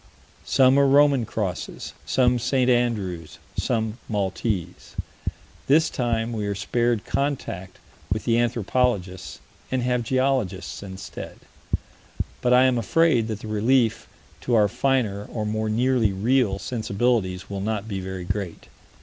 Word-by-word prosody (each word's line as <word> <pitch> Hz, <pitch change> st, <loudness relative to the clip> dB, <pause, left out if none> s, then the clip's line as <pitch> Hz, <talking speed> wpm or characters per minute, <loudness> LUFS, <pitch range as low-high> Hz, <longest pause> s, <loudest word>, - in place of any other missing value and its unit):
Some 130 Hz, +1 st, +5 dB
are 140 Hz, -, +5 dB
Roman 140 Hz, -4 st, +5 dB
crosses, 95 Hz, -5 st, -4 dB
some 125 Hz, -2 st, +3 dB
St. 130 Hz, +1 st, +2 dB
Andrew's, 105 Hz, -9 st, -1 dB, 0.2 s
some 110 Hz, -1 st, -1 dB
Maltese. 95 Hz, -3 st, -2 dB, 0.7 s
This 155 Hz, +4 st, +4 dB
time 115 Hz, -2 st, -1 dB
we 105 Hz, -2 st, -2 dB
are 100 Hz, -, -1 dB
spared 120 Hz, +2 st, 0 dB
contact 135 Hz, -10 st, -2 dB, 0.3 s
with 105 Hz, +3 st, 0 dB
the 115 Hz, -1 st, +3 dB
anthropologists 115 Hz, -5 st, 0 dB, 0.3 s
and 130 Hz, -1 st, 0 dB
have 125 Hz, 0 st, +1 dB
geologists 130 Hz, -6 st, 0 dB
instead, 95 Hz, -1 st, -8 dB, 1.0 s
but 125 Hz, -, +2 dB
I 125 Hz, +1 st, +7 dB
am 130 Hz, -2 st, +3 dB
afraid 120 Hz, 0 st, +3 dB
that 110 Hz, -2 st, -4 dB
the -, -, -7 dB
relief 115 Hz, +2 st, +2 dB, 0.3 s
to 120 Hz, -, 0 dB
our 105 Hz, -2 st, +5 dB
finer, 110 Hz, -4 st, 0 dB
or 110 Hz, -2 st, -4 dB
more 110 Hz, +1 st, -1 dB
nearly 120 Hz, -1 st, +2 dB
real, 110 Hz, +1 st, +2 dB
sensibilities 105 Hz, -2 st, -1 dB
will 100 Hz, -1 st, -4 dB
not 105 Hz, 0 st, -2 dB
be 100 Hz, -3 st, -3 dB
very 95 Hz, -1 st, -5 dB
great. 95 Hz, -2 st, -4 dB
115 Hz, 130 wpm, -24 LUFS, 100-125 Hz, 1.0 s, I